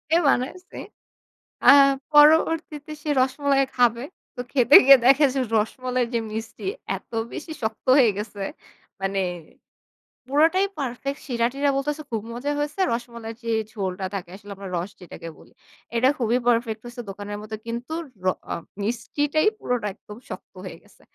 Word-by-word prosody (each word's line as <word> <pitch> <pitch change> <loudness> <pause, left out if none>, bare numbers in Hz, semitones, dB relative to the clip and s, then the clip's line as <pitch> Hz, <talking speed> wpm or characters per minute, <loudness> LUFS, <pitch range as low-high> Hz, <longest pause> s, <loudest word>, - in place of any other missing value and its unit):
এ - - +6
বানাইছি। 360 +10 -2 0.9
আ - - +12 0.4
পরবর্তীতে 305 0 +4
সে 305 - -4
রসমালাই 275 +1 +2
খাবে। 240 0 +3 0.3
তো - - -11
খেতে 265 +1 +5
গিয়ে 275 -1 +10
দেখে 275 +3 +6
যে, 270 - -1 0.2
রসমালাইর 250 +3 -1
যে, 230 - +2
মিষ্টি, 225 +1 -6 0.3
এত - - -20 0.2
বেশি 315 +1 -7
শক্ত 220 0 -4
হয়ে 245 -5 +6
গেছে। 205 -1 -6 0.6
মানে 195 0 -1 1.1
পুরোটাই 325 +8 +3
পারফেক্ট, 275 +1 -4
সিরা-টিরা 250 +4 0
বলতেছে 295 +3 -2
খুব 220 -2 -1
মজা 255 +5 -3
হয়েছে। 295 +5 -3
রসমালাইর 235 -1 -6
যে, 230 - -2 0.2
ঝোলটা 190 -3 -3
থাকে, 180 -3 -5
আসলে 205 +1 -12
আমরা 195 0 -9
রস 180 +4 -4
যেটাকে 165 -1 -9
বলি। - - -18 0.4
এটা 255 +3 +4
খুবই 240 0 +1
পারফেক্ট 230 -2 +1
হইছে, 240 0 -7
দোকানের 205 +1 -6
মতো। 215 +1 -6
কিন্তু 240 +6 -5 0.3
র - - -8 0.3
আ - - -1 0.3
মিষ্টিটাই 290 - 0
পুরোটা 245 -4 -1
একদম 210 +3 -13
শক্ত - - -9
হয়ে - - -8
গেছে। - - -24
245 Hz, 150 wpm, -24 LUFS, 220-285 Hz, 1.1 s, আ